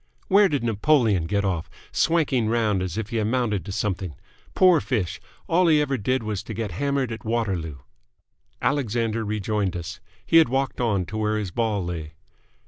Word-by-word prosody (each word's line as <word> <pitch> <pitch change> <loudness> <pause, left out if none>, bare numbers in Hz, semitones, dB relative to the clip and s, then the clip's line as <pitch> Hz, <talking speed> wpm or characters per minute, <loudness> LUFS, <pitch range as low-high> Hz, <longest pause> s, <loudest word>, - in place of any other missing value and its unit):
Where 200 0 +6
did 145 -5 -1
Napoleon 110 - +2
get 100 +1 0
off, 90 -4 -2 0.2
swanking 140 -9 +2
round 110 -4 +1
as 95 +1 -3
if 110 -1 -3
he 115 - -1
amounted 110 -2 0
to 100 - -5
something? 95 -5 -2 0.4
Poor 185 -3 +6
fish! 95 -7 -2 0.3
All 175 +2 +3
he 155 -2 +5
ever 140 -2 0
did 130 +2 0
was 105 -3 -3
to 110 - -7
get 110 -2 -3
hammered 140 +5 -1
at 110 -1 -6
Waterloo!" 95 -10 -2 0.9
Alexander 115 -4 0
rejoined 105 -2 -1
us. 85 +1 -7 0.3
He 165 - +4
had 160 -6 +6
walked 135 0 -1
on 100 -6 +1
to 110 - -6
where 110 0 0
his 100 -4 -3
ball 105 -3 -1
lay. 80 -3 -5
110 Hz, 175 wpm, -24 LUFS, 95-130 Hz, 0.9 s, Where